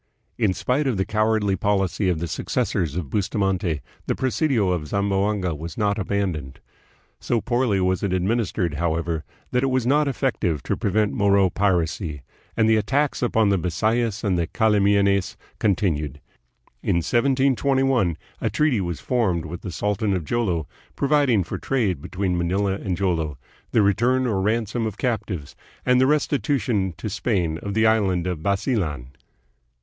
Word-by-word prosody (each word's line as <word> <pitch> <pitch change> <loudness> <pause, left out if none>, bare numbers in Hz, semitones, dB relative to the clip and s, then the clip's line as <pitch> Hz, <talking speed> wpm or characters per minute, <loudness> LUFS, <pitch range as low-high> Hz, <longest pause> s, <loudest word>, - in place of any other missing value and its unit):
In 105 -5 +3
spite 135 - 0
of 125 -6 0
the 95 - 0
cow 110 +1 +1
ardly 105 -3 +1
policy 95 0 0
of 90 - +1
the 85 +2 -3
successors 80 -1 -1
of 80 -7 -4
Bustamante, 95 - 0 0.3
the - - 0
presidio 130 - +1
of 85 -4 -2
Zamboanga 100 -1 0
was 80 +2 -7
not 105 -1 +1
abandoned. 90 -9 -2 0.6
So 120 - 0
poorly 120 -4 +1
was 95 0 +1
it 100 - -1
ad 90 -1 0
ministered, 100 -5 0
however, 80 0 -1 0.3
that 125 - +2
it 135 - +1
was 130 -2 0
not 145 +3 +3
effective 120 - -1
to - - -1
prevent 105 +1 0
Moro 100 -2 +3
piracy, 85 -6 0 0.3
and 110 -1 +4
the 110 0 +4
attacks 140 +6 0
upon 110 -4 +2
the 100 -2 +2
Bisayas 110 +5 0
and 90 -5 0
Cala 110 -3 +3
mianes 100 -1 +2 0.2
continued. 80 -9 0 0.6
In - - 0
1721 130 - +2 0.2
a - - +1
treaty 150 -9 +1
was 85 -3 -3
formed 100 -10 0
with 85 +2 -7
the 95 - -6
sultan 105 +2 0
of 85 -4 -3
Jolo 90 -7 0 0.3
providing 140 -8 +3
for - - -5
trade 105 - 0
between 90 +2 -2
Manila 95 +3 0
and 95 -2 -3
Jolo, 80 -7 -1 0.3
the 110 - +3
return 120 +6 +2
or 105 -6 0
ransom 110 +2 0
of 105 -2 -6
captives, 105 - -3 0.3
and 125 0 +4
the 130 - +4
restitution 130 - 0
to - - -5
Spain 95 -6 -1
of 100 0 -5
the 110 0 +3
island 100 -6 +2
of 90 -4 -3
Basilan. 95 - -1
100 Hz, 160 wpm, -23 LUFS, 90-115 Hz, 0.6 s, and